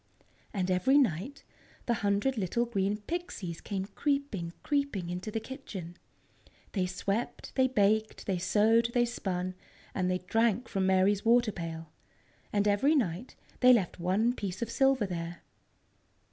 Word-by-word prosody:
And 185 -3 -1
every 185 +10 +4
night 250 - 0 0.4
the 240 - +2
hundred 205 +5 +1
little 220 +3 0
green 205 -3 0
Pixies 210 - -5
came 195 -2 -3
creeping, 215 - -2
creeping 280 - -1
into 180 +4 -4
the 225 - -2
kitchen. 210 - -8 0.8
They 185 -3 0
swept, 195 +5 -3
they 260 -1 +3
baked, 215 -2 +1
they 190 -3 -1
sewed, 220 +5 +3
they 240 0 +4
spun, 185 -6 -3 0.4
and 185 -1 0
they 185 - +1
drank 225 +4 +1
from 190 -1 0
Mary's 190 +2 +3
water 235 0 +4
pail. 165 -3 -6 0.6
And 205 0 +2
every 220 +10 +3
night 210 - -1 0.2
they 250 0 +7
left 195 -7 +1
one 195 +7 +2
piece 195 -3 -4
of 230 - -5
silver 270 -4 +3
there. 170 -2 -5
205 Hz, 145 wpm, -30 LUFS, 185-240 Hz, 0.8 s, they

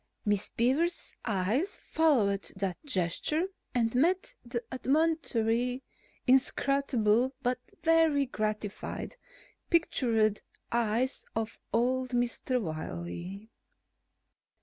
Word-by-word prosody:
Miss 205 -1 +1
Beaver's 290 +9 0
eyes 220 - 0
followed 225 -12 +2
that 190 - -3
gesture 260 - +1 0.3
and 230 -2 +2
met 365 - +2
the 235 0 -3
admonitory, 255 -4 +1 0.4
inscrutable, 260 -2 +3
but 250 0 +1 0.2
very 325 -4 +4
gratified 215 - -3 0.5
pictured 230 - +2 0.3
eyes 235 +3 0
of 225 0 -3
old 255 +2 +1
Mr. 245 +1 0
Wiley. 170 - -5
245 Hz, 80 wpm, -30 LUFS, 215-275 Hz, 0.5 s, very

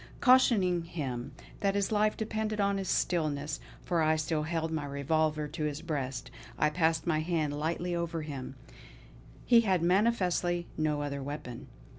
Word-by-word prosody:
Cautioning 220 -9 +5
him 135 -8 -4 0.3
that 200 0 +1
his 200 0 0
life 215 0 +2
depended 220 -1 -2
on 200 -1 +2
his 190 - -4
stillness, 150 -4 0 0.2
for 170 -2 +1
I 155 0 +3
still 155 0 -1
held 160 +1 -2
my 155 -2 -2
revolver 150 +2 0
to 155 +1 -4
his 150 +1 -3
breast, 135 -6 -3 0.3
I 150 - +2
passed 160 0 +1
my 160 -3 +1
hand 155 -2 0
lightly 170 +3 -1
over 170 -1 -2
him; 135 -3 -6 0.9
he 235 -2 +6
had 190 -6 +1
manifestly 180 -3 +2
no 150 -2 0
other 140 -1 -3
weapon. 140 -3 -6
160 Hz, 155 wpm, -30 LUFS, 150-185 Hz, 0.9 s, he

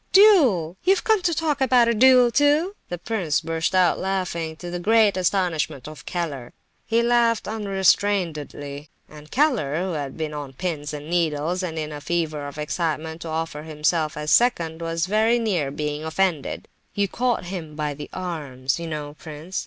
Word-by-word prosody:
"Duel! 265 - +5
You've 380 0 +3
come 440 -3 +3
to 350 - +1
talk 300 -3 -1
about 250 -3 +4
a 235 - +3
duel, 250 +1 +6
too!" 295 - +3 0.2
The 175 - -3
prince 175 -4 -1
burst 165 +2 -2
out 180 -2 +3
laughing, 180 -4 -2
to 175 +2 -8
the 175 - -3
great 215 +1 +4
astonishment 175 -7 0
of 155 -1 -11
Keller. 145 -9 -4 0.3
He 230 +1 +2
laughed 235 -1 +2
unrestrainedly, 185 -8 0 0.2
and 150 0 -14
Keller, 245 - +1
who 185 +1 -2
had 145 -4 -4
been 155 -1 -3
on 145 -2 -6
pins 150 -1 -4
and 150 0 -7
needles, 170 +1 0
and 165 -3 -4
in 155 -1 -3
a 145 -1 -7
fever 155 -2 -2
of 145 - -9
excitement 160 +1 -3
to 170 - -6
offer 160 -1 -3
himself 155 0 -1
as 150 0 -2
"second," 170 -9 +2
was 165 0 -1
very 220 +4 +3
near 190 -12 0
being 150 +1 -3
offended. 160 -2 -1 0.3
"You 200 0 +1
caught 240 -1 -1
him 170 -4 -6
by 150 -1 -2
the 145 +1 -9
arms, 145 -7 -3
you 170 - -5
know, 150 -2 -5
prince. 160 +4 -6
170 Hz, 175 wpm, -23 LUFS, 150-210 Hz, 0.3 s, duel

